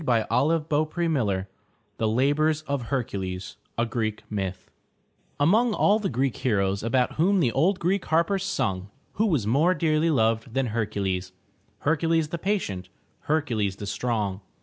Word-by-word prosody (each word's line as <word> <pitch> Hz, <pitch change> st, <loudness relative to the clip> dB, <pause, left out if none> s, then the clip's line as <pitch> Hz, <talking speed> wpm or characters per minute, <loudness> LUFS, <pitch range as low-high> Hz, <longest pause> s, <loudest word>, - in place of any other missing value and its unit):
422 130 Hz, +6 st, +2 dB
THE 155 Hz, 0 st, +2 dB
TREASURE 145 Hz, -, 0 dB
CHEST -, -, -15 dB, 0.5 s
THE 110 Hz, -, +1 dB
LABORS 145 Hz, +7 st, +2 dB
OF 140 Hz, -3 st, -2 dB
HERCULES 95 Hz, -8 st, -3 dB, 0.2 s
A 115 Hz, -, +2 dB
Greek 110 Hz, -2 st, -2 dB
Myth 95 Hz, -3 st, -4 dB, 0.7 s
Among 215 Hz, +10 st, +3 dB
all 210 Hz, +2 st, +4 dB
the 205 Hz, -, -1 dB
Greek 130 Hz, 0 st, 0 dB
heroes 100 Hz, -5 st, 0 dB
about 125 Hz, +3 st, 0 dB
whom 190 Hz, +5 st, +3 dB
the 130 Hz, -9 st, +2 dB
old 170 Hz, -, +2 dB
Greek 185 Hz, +2 st, 0 dB
harpers 170 Hz, +4 st, +1 dB
sung, 95 Hz, -, -1 dB, 0.3 s
who 220 Hz, -, +4 dB
was 150 Hz, -, +1 dB
more 150 Hz, -, +3 dB
dearly 155 Hz, 0 st, +2 dB
loved 115 Hz, -3 st, +1 dB
than 135 Hz, -3 st, +1 dB
Her'cu 110 Hz, -2 st, -2 dB
les— 95 Hz, -1 st, -2 dB, 0.5 s
Hercules, 160 Hz, 0 st, +1 dB
the 170 Hz, -, -4 dB
patient, 160 Hz, -, -2 dB, 0.4 s
Hercules 120 Hz, -11 st, 0 dB
the 105 Hz, -, -7 dB
strong? 105 Hz, -2 st, -2 dB
130 Hz, 150 wpm, -26 LUFS, 105-165 Hz, 0.7 s, all